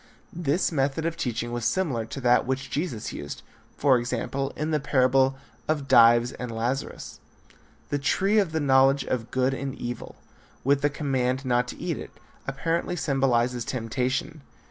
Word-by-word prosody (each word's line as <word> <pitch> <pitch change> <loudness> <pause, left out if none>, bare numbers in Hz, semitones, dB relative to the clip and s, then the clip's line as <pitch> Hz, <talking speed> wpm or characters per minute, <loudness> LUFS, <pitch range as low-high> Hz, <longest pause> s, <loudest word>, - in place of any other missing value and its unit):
This 170 +1 0
method 140 +1 0
of 165 0 -1
teaching 120 -5 -3
was 120 -1 -3
similar 130 -9 0
to 135 - -6
that 125 0 +3
which 135 0 -2
Jesus 145 -8 -3
used, 70 0 -7 0.3
for 135 -4 +4
example, 130 +3 -2
in 155 +1 -2
the 155 - +2
parable 135 -1 +3 0.3
of 150 -3 -1
Dives 120 0 +6
and 125 - -6
Lazarus. 120 +4 -3 0.7
The 145 - 0
tree 195 +8 +2
of 190 -6 +1
the 160 - 0
knowledge 135 -1 +4
of 120 -3 -2
good 130 +1 +1
and 135 0 -4
evil, 120 -2 -6 0.5
with 140 +1 +3
the 145 - +3
command 130 -2 -1
not 125 -1 +2
to - - -7
eat - - -3
of - - -6
it, - - -16 0.4
apparently 165 +6 -1
symbolizes 125 -5 +1
temptation. 125 +5 -2
135 Hz, 165 wpm, -26 LUFS, 125-145 Hz, 0.7 s, Dives